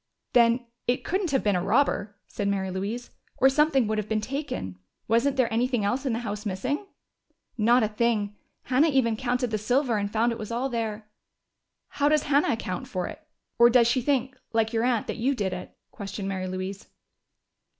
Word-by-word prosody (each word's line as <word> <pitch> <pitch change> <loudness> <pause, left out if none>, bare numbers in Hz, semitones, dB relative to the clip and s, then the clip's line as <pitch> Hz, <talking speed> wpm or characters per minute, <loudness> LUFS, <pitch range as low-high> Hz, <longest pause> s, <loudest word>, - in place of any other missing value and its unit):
"Then 235 0 +4 0.2
it 245 +1 +1
couldn't 375 0 -1
have 270 -2 +1
been 205 -2 +2
a 180 - +1
robber," 210 -1 +1
said 205 - -3
Mary 190 -1 -1
Louise. 205 +6 -4 0.3
"Or 265 - +6
something 275 -2 +3
would 215 0 0
have 215 - -5
been 220 -1 +1
taken. 220 - -4 0.3
Wasn't 245 +5 +2
there 240 -3 +2
anything 240 -2 +1
else 255 +6 0
in 250 - +1
the - - 0
house 210 0 -4
missing?" 255 - -2 0.7
"Not 240 +1 +4
a - - +3
thing! 210 -2 0 0.3
Hannah 270 +5 +3
even 255 -6 +2
counted 245 0 -1
the 215 - 0
silver 245 +2 +1
and 205 0 -2
found 230 +2 +2
it 230 - -5
was 215 +1 -6
all 245 +3 -1
there." 225 -3 -3 0.8
"How 290 0 +1
does 305 -1 +3
Hannah 285 -2 +2
account 185 -5 -4
for 180 -1 -3
it? - - -8 0.4
Or 235 0 +8
does 240 -1 +5
she 245 +2 +2
think, 260 -1 0 0.2
like 225 0 +1
your 225 0 +1
aunt, 245 -3 +1
that - - -4
you 265 +4 +1
did 195 -5 -1
it?" 180 0 -8
questioned 200 -2 -6
Mary 190 -1 -3
Louise. 185 +2 -5
230 Hz, 195 wpm, -26 LUFS, 205-255 Hz, 0.8 s, Or